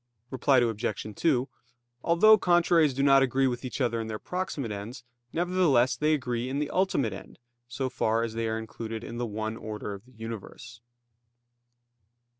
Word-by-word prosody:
Reply 135 +1 +3
Obj. 110 -3 -1
2: 135 -6 +1 0.6
Although 195 +6 +6
contraries 170 -5 +3
do 135 - 0
not 135 -1 +6
agree 135 +1 +2
with 125 -1 -1
each 130 - -5
other 120 -3 0
in 110 - -5
their 110 -1 -4
proximate 165 - -4
ends, 105 +5 -7 0.3
nevertheless 165 -8 +2
they 150 +5 +2
agree 125 -3 -3
in 135 - -2
the 150 0 -2
ultimate 145 - +1
end, 95 - -11 0.3
so 130 +2 -3
far 115 -3 0
as 115 -1 -3
they 115 0 -2
are 110 0 -1
included 110 0 -6
in 120 0 -6
the 120 - -1
one 110 +1 -4
order 105 -2 -6
of 100 +3 -10
the 130 - -20
universe. 115 0 -9
120 Hz, 170 wpm, -28 LUFS, 110-140 Hz, 0.6 s, Although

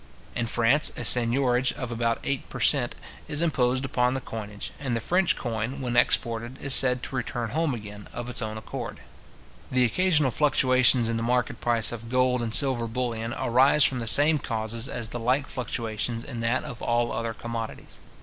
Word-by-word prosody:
In 120 -1 -2
France, 120 +6 +3
a 120 - -4
seignorage 125 +2 +3
of 125 -2 -6
about 115 0 -1
eight 140 -1 -3
per - - -8
cent. - - +2 0.3
is 150 +3 -1
imposed 130 -5 0
upon 125 -1 0
the - - -1
coinage, 105 -4 -7
and 130 -4 -2
the - - -1
French 180 +7 +1
coin, 115 +3 -4
when 125 -2 -3
exported, 120 +1 0
is 140 - 0
said 125 -2 +5
to - - -6
return 120 -3 -4
home 155 -1 0
again, 105 -2 -10
of 120 0 -6
its 125 - -1
own 110 0 -4
accord. 110 - -7 0.7
The 125 -1 +2
occasional 150 0 +2
fluctuations 130 -4 +3
in 115 0 -1
the - - -1
market 125 0 -1
price 115 -2 +2
of 115 -1 -8
gold 125 0 +1
and 115 -1 -3
silver 125 -2 +2
bullion 115 -1 -3
arise 130 +5 +4
from 130 - +2
the 115 - -4
same 145 +7 +6
causes 115 0 -3
as 120 -3 -3
the 120 - -5
like 130 +4 0
fluctuations 115 -2 -4
in 120 -4 -7
that 115 +2 0
of 140 -6 -8
all 120 0 0
other 115 -1 -3
commodities. 115 -1 -7
120 Hz, 190 wpm, -25 LUFS, 115-130 Hz, 0.7 s, same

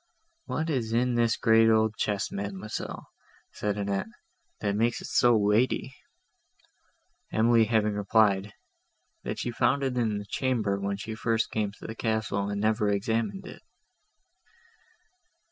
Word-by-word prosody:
"What 160 +1 -2
is 115 -5 -1
in 125 +1 +2
this 120 -1 +2
great 115 0 +5
old 110 -1 +3
chest, 105 -2 -1
Mademoiselle," 100 +1 -5 0.5
said 105 -1 -2
Annette, 100 - -2 0.5
"that 100 -1 -1
makes 115 +2 +1
it - - -8
so 120 -2 +4
weighty?" 110 +5 +1 1.4
Emily 115 0 +4
having 105 -1 +1
replied, 105 -1 +2 0.7
"that - - -4
she 120 - -3
found 140 +4 +1
it 130 -2 -1
in 110 -4 0
the 105 - -6
chamber, 110 -5 -1
when 100 0 -2
she 110 +2 -6
first 115 0 -1
came 105 -2 -1
to - - -13
the 110 - -5
castle, 110 -3 -1
and 100 0 -3
had - - +4
never 105 -1 +1
examined 115 - -1
it." - - -10
110 Hz, 145 wpm, -27 LUFS, 105-115 Hz, 1.4 s, great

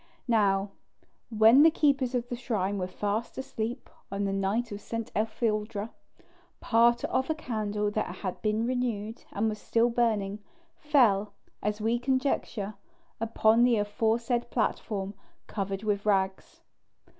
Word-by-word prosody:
Now, 200 -4 +2 0.6
when 225 +4 +6
these 320 +1 +7
keepers 275 -4 +2
of 240 -1 -1
the 245 - -3
shrine 205 -5 -2
were 180 - -2
fast 205 +5 -3
asleep, 245 -1 -4 0.2
on 200 0 -2
the 195 -1 -1
night 200 +5 -1
of 205 0 -6
St. 230 +1 -5
Etheldreda, 215 -1 -1 0.7
part 235 +1 +3
of 260 +2 0
a 315 - +1
candle 210 -7 -2
that 215 +1 -2
had 185 -3 -5
been 215 +1 0
renewed, 235 -3 -2
and 215 +2 0
was 215 -1 -3
still 235 +1 +2
burning, 215 -4 0 0.4
fell, 230 -9 +3 0.3
as 210 +1 -2
we 230 +2 +1
conjecture, 255 -5 -1 0.5
upon 225 0 +3
the 245 -1 +5
aforesaid 230 +3 0
platform 205 -3 -2 0.3
covered 195 -1 -4
with 205 -1 0
rags. 190 -2 0
220 Hz, 135 wpm, -28 LUFS, 205-240 Hz, 0.7 s, these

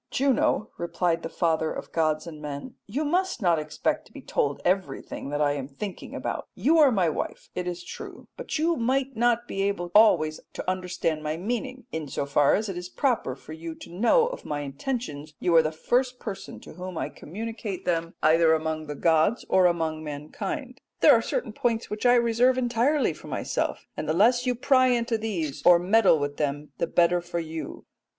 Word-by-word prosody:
"'Juno,' 260 -5 +1
replied 170 -1 0
the 165 - -5
father 160 -1 0
of - - -7
gods 155 -1 +1
and 155 -3 -9
men, 145 - -6
'you 275 +9 -2
must 365 +3 0
not 175 -6 +3
expect 150 - -2
to - - -23
be - - -10
told 140 -1 -1
everything 185 -6 -1
that 145 +1 -1
I 145 -1 +3
am 140 -2 -3
thinking 185 +8 -7
about: - - -4
you 320 +3 +3
are 290 -4 +7
my 190 -6 +2
wife, 155 - -4
it 180 0 -3
is 175 0 -4
true, - - -9
but - - -4
you 330 +2 +2
might 265 +2 0
not 240 +1 +2
be 195 - -3
able 195 -3 -1
always 155 -8 +5
to - - -6
understand 180 -4 -1
my 155 +1 -2
meaning; 245 +7 -4
in 160 -2 -4
so 140 - -3
far 140 0 +3
as 215 +2 -1
it 195 - -4
is 180 0 -8
proper 235 - 0
for 150 +3 -11
you 160 0 -7
to - - -12
know 240 - +4
of - - -5
my 145 -1 -3
intentions 150 - -5
you 175 -2 +2
are 165 - +8
the 155 0 -1
first 250 +10 0
person 205 -5 -7
to - - -12
whom 180 +1 -7
I - - -1
communicate 215 +2 -6
them 165 -1 -1
either 160 +1 +5
among 155 0 -3
the 150 - -5
gods 165 - +2
or 185 -1 +5
among 160 -2 -1
mankind, 250 - -5 0.2
but - - +4
there - - +9
are - - +3
certain - - -3
points 230 -1 -1
which 210 +4 0
I 245 - +6
reserve 240 +2 +3
entirely 250 +4 +2
for - - -13
myself, - - -2
and 155 - -4
the - - +2
less 240 +8 +3
you 250 - +2
try - - -19
to - - -11
pry 255 -2 +6
into 235 -2 +1
these, 175 -10 -3
or 175 -1 +8
meddle 190 0 +4
with 145 -1 -3
them, 145 0 -2
the 170 - +1
better 175 +1 +3
for 175 0 -5
you.'" 160 -1 -5
180 Hz, 210 wpm, -26 LUFS, 155-240 Hz, 0.2 s, there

